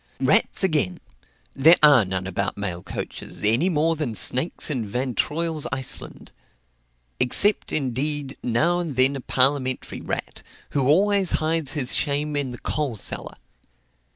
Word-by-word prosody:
Rats - - +3
again! 150 - +1 0.6
there 160 +5 +6
are 140 -8 +7
none 95 0 -2
about 100 +2 -3
mail 95 -4 -4
coaches, - - -7
any 115 - +3
more 165 0 +1
than 145 -8 -4
snakes 130 +8 +1
in 125 -6 -2
Van 125 +5 -3
Troil's 160 +3 -1
Iceland; 130 -1 -4 0.9
except, 205 +12 +2
indeed, 140 +1 -2
now 160 +10 +1
and 165 -6 -4
then 130 +2 +2
a 135 - -6
parliamentary 130 0 +1
rat, - - -5 0.3
who 135 -3 0
always 195 +4 +2
hides 155 -3 -1
his 135 -4 0
shame 145 0 0
in 140 -2 -1
the 125 - -8
"coal 145 -3 -3
cellar." - - -3
140 Hz, 140 wpm, -23 LUFS, 125-155 Hz, 0.9 s, are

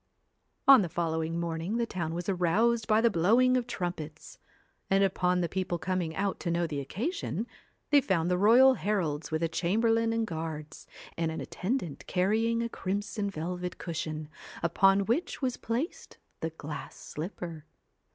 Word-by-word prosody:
On 275 -4 +10
the 180 - -2
following 165 0 -1
morning 170 +5 -2
the 235 - +1
town 170 -6 -3
was 175 +1 -4
aroused 210 +5 +2
by 215 0 +4
the 235 0 +4
blowing 230 +9 +4
of 250 -1 0
trumpets, 170 -7 -5 0.5
and, 195 +1 +4
upon 180 -1 +2
the 170 - +1
people 185 -1 -2
coming 170 -1 -2
out 195 0 -1
to 175 - -3
know 170 0 +1
the 150 -3 -3
occasion, 220 - -3 0.5
they 290 -1 +7
found 180 -6 +1
the 180 - +2
royal 245 +6 +7
heralds 175 - -1
with 160 +1 -1
a - - +3
chamberlain 225 +7 +1
and 230 0 0
guards, 160 -4 -6 0.3
and 165 -1 0
an 160 - -4
attendant 185 - -3
carrying 225 +5 +1
a - - -1
crimson 200 0 -2
velvet 180 +1 -4
cushion, 155 -2 -4 0.4
upon 195 +4 +4
which 250 - -1
was 255 -3 -1
placed 245 +9 -4 0.2
the 160 - -2
glass 155 -2 -7
slipper. 165 -1 -6
180 Hz, 160 wpm, -29 LUFS, 165-225 Hz, 0.5 s, On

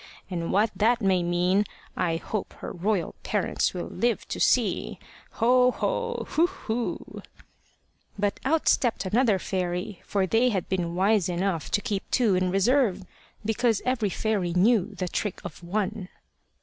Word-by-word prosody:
And 170 -2 -2
what 210 +2 +3
that 235 +3 +3
may 190 -4 +2
mean 175 +3 +2 0.3
I 165 -2 0
hope 200 +5 -4
her - - -7
royal 185 -1 -1
parents 205 -3 0
will 175 - -3
live 240 -1 -1
to - - -4
see. - - +1 0.4
Ho, 250 +2 +4
ho! 475 - -2
Hu, 335 +3 +3
hu!" 245 -11 -4 1.0
But 205 0 -1
out 310 +4 +1
stepped 235 -6 +2
another 220 +1 +3
fairy, 180 +1 -3
for 195 -2 0
they 225 +6 +3
had 190 -6 -2
been 175 -3 -2
wise 195 0 +2
enough 175 -2 -1
to 205 - +1
keep 200 -2 -3
two 230 -6 +3
in 185 0 +1
reserve, 200 0 +2 0.4
because 225 0 +1
every 245 -5 +1
fairy 195 -4 -1
knew 200 +2 +3
the 185 -1 -3
trick 205 +2 -3
of 175 - -8
one. 195 +1 -2
200 Hz, 150 wpm, -26 LUFS, 180-230 Hz, 1.0 s, Ho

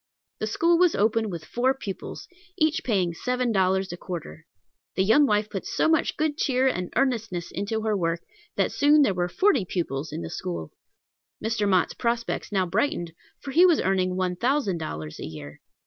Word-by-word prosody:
The 215 - -2
school 335 +9 +2
was 360 -2 +4
opened 220 +1 +1
with 170 -4 -6
four 260 +2 +1
pupils, 200 -8 -7 0.3
each 315 -1 +1
paying 190 -7 +1
seven 250 +6 -1
dollars 190 -2 +1
a - - -6
quarter. 170 -3 -7 0.5
The 190 - +2
young 280 +9 +5
wife 210 -1 +2
put 195 -3 -5
so - - 0
much 320 -1 +2
good 305 -1 -1
cheer 260 -1 +2
and 180 -8 -1
earnestness 225 -9 -1
into 210 +4 -2
her 215 -1 +1
work, 170 -2 -1 0.3
that - - +1
soon 295 +1 +5
there 205 - +2
were 175 -1 -1
forty 370 - +3
pupils 160 -5 -3
in 160 +3 -5
the - - -6
school. 175 - -5 0.7
Mr. 220 -2 0
Mott's 185 -2 +2
prospects 235 -1 -2
now 190 -2 +2
brightened, 175 - -1 0.3
for 275 - -6
he 330 +6 +5
was 350 -4 +5
earning 185 -1 +1
one 185 -1 -1
thousand 240 - 0
dollars 80 - -6
a - - -5
year. 75 -2 -10
205 Hz, 185 wpm, -25 LUFS, 180-255 Hz, 0.7 s, young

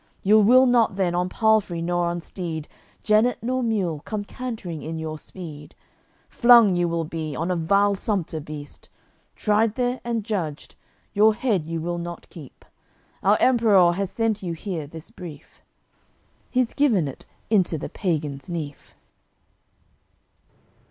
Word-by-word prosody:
You 215 +3 +6
will 250 +5 +6
not 240 -5 +3
then 185 -3 0
on 180 +1 0
palfrey 215 -5 +2
nor 175 +1 0
on 170 0 -2
steed, 165 -3 -5 0.4
Jennet 220 +3 +3
nor 255 +2 0
mule, 200 -10 -1
come 210 +7 -4
cantering 215 -11 -6
in 160 +1 -5
your 155 -1 -5
speed; 150 -6 -10 0.5
Flung 235 -6 +6
you 175 0 +1
will 170 0 -1
be 155 -1 -5
on 165 +3 -2
a - - +1
vile 200 +5 +3
sumpter 190 -5 -2
beast; 150 -1 -9 0.5
Tried 215 +1 +1
there 250 0 -1
and 235 -2 -2
judged, 180 -9 -4 0.4
your 215 +1 +5
head 210 -9 0
you 165 -1 -3
will 175 +1 -3
not 170 0 -7
keep. 150 -7 -13 0.6
Our 205 +3 +4
Emperour 215 -8 +5
has 195 +1 -2
sent 225 -1 -1
you 175 -3 -3
here 165 -3 -5
this 160 +1 -11
brief." 170 -6 -11 0.9
He's 250 -2 0
given 230 - +2
it 135 - -9 0.2
into 185 -6 +2
the - - -5
pagan's 150 -4 -3
nief. 155 -5 -6
185 Hz, 145 wpm, -24 LUFS, 165-220 Hz, 0.9 s, You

